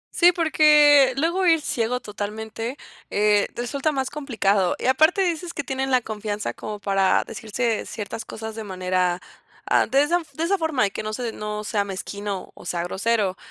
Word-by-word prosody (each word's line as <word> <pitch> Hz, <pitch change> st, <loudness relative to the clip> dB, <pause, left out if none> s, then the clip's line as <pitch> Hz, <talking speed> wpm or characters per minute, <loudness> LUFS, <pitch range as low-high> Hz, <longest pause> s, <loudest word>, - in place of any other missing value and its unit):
Sí, 350 Hz, 0 st, +6 dB
porque 300 Hz, -5 st, +5 dB
luego 340 Hz, +6 st, +1 dB
ir 325 Hz, -1 st, +5 dB
ciego 250 Hz, -3 st, -1 dB
totalmente, 220 Hz, +3 st, -5 dB, 0.3 s
eh, 210 Hz, 0 st, +3 dB
resulta 275 Hz, +5 st, -1 dB
más 265 Hz, -3 st, -2 dB
complicado, 205 Hz, -10 st, +1 dB
y -, -, -6 dB
aparte 315 Hz, +9 st, +4 dB
dices 345 Hz, 0 st, -2 dB
que 285 Hz, -, -3 dB
tienen 265 Hz, 0 st, -2 dB
la 255 Hz, -1 st, +3 dB
confianza 210 Hz, -2 st, -4 dB
como 210 Hz, -1 st, -6 dB
para 195 Hz, -1 st, +2 dB
decirse 225 Hz, +1 st, -2 dB
ciertas 220 Hz, +1 st, -6 dB
cosas 220 Hz, 0 st, -7 dB
de 220 Hz, 0 st, -6 dB
manera, 185 Hz, -2 st, -1 dB, 0.4 s
ah, -, -, +3 dB
de 270 Hz, +4 st, +3 dB
esa 345 Hz, +4 st, +2 dB
de 320 Hz, -, -3 dB
esa 385 Hz, +3 st, +1 dB
forma 310 Hz, -9 st, +1 dB
y 195 Hz, -, -2 dB
que -, -, -4 dB
no 215 Hz, 0 st, -5 dB
se 240 Hz, 0 st, -3 dB
no 210 Hz, -1 st, -5 dB
sea 210 Hz, -1 st, 0 dB
mezquino 200 Hz, 0 st, -5 dB
o, -, -, -14 dB
sea 170 Hz, -1 st, -1 dB
grosero, 195 Hz, +1 st, 0 dB
225 Hz, 180 wpm, -23 LUFS, 205-290 Hz, 0.4 s, Sí